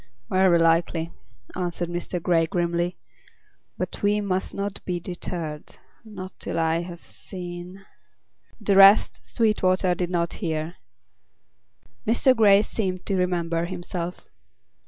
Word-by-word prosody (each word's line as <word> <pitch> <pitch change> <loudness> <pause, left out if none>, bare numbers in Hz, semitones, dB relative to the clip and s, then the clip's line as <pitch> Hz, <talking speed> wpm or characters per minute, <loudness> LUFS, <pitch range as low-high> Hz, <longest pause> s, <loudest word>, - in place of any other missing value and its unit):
"Very 185 -2 +5
likely," 165 0 +2 0.4
answered 175 -1 -2
Mr. 175 +1 -3
Grey 165 -1 +2
grimly. 175 +1 -1 0.8
"But - - -4
we 205 0 +2
must 190 -2 -2
not 200 0 -4
be 180 -1 -2
deterred—not 180 +3 -8
till - - -4
I 165 0 +2
have 175 -1 -9
seen—" 180 +1 -7 0.7
the 205 -2 +1
rest 195 -8 +6
Sweetwater 185 - +1
did 175 0 -2
not 170 -1 -1
hear. 160 -1 -3 1.3
Mr. 245 +3 +4
Grey 205 -3 +6
seemed 185 -5 -3
to 195 - 0
remember 170 -2 0
himself. 175 -1 -5
180 Hz, 115 wpm, -25 LUFS, 170-195 Hz, 1.3 s, rest